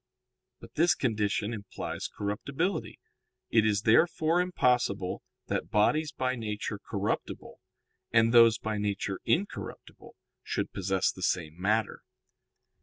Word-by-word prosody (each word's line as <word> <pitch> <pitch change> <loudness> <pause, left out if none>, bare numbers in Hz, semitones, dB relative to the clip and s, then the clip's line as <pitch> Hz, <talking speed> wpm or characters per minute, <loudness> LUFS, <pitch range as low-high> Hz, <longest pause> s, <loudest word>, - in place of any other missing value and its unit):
But - - -14
this 175 +2 +3
condition 110 -2 -1
implies 105 -3 -5
corruptibility. 135 - -3 0.5
It 110 -1 +4
is 105 -1 +1
therefore 160 +7 +3
impossible 125 - 0 0.2
that 100 -3 -3
bodies 145 +8 +2
by 130 -2 -1
nature 105 -3 -4
corruptible, - - -4 0.5
and 115 0 +4
those 115 -1 +7
by 110 -1 -3
nature 100 -1 -2
incorruptible, 195 +5 -3 0.3
should - - -3
possess 95 -1 0
the 95 - -12
same 85 -4 -1
matter. 110 +3 0
110 Hz, 110 wpm, -29 LUFS, 100-130 Hz, 0.5 s, those